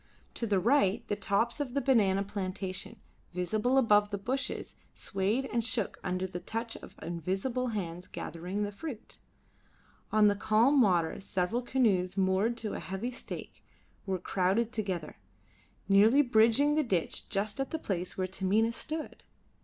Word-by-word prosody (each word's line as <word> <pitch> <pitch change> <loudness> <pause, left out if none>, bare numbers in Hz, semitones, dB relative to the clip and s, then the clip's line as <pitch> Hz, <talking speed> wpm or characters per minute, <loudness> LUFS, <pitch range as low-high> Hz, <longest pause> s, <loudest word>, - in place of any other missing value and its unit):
To 230 - -3
the 200 -2 +2
right 220 -1 +2
the 205 - +1
tops 225 +7 0
of 275 -3 -3
the - - +3
banana 205 -8 +3
plantation, 190 -1 -4 0.4
visible 215 +8 +1
above 210 -5 +4
the 205 - -2
bushes, 255 +7 -3 0.2
swayed 200 +7 -1
and 235 -1 +1
shook 220 -3 -1
under 185 0 -1
the 180 -1 -5
touch 225 +5 -4
of - - -12
invisible 190 - -2
hands 180 -5 -4
gathering 180 +5 -4
the 205 - -3
fruit. 240 +1 -8 0.9
On 215 -1 +5
the 205 - +4
calm 230 +7 +4
water 175 -7 +2
several 195 +4 -1
canoes 205 -8 +1
moored 195 +5 +2
to 220 -2 -4
a - - -4
heavy 195 +6 -4
stake 250 - -7 0.4
were 190 -1 0
crowded 190 +6 0
together, 185 - -3 0.7
nearly 215 +8 +6
bridging 240 +4 +4
the 310 - +3
ditch 185 - -1
just 210 +4 -1
at 270 - -1
the 320 - -2
place 185 - -3
where 185 - 0
Taminah 195 +5 +1
stood. 310 +5 -5
205 Hz, 155 wpm, -30 LUFS, 190-235 Hz, 0.9 s, nearly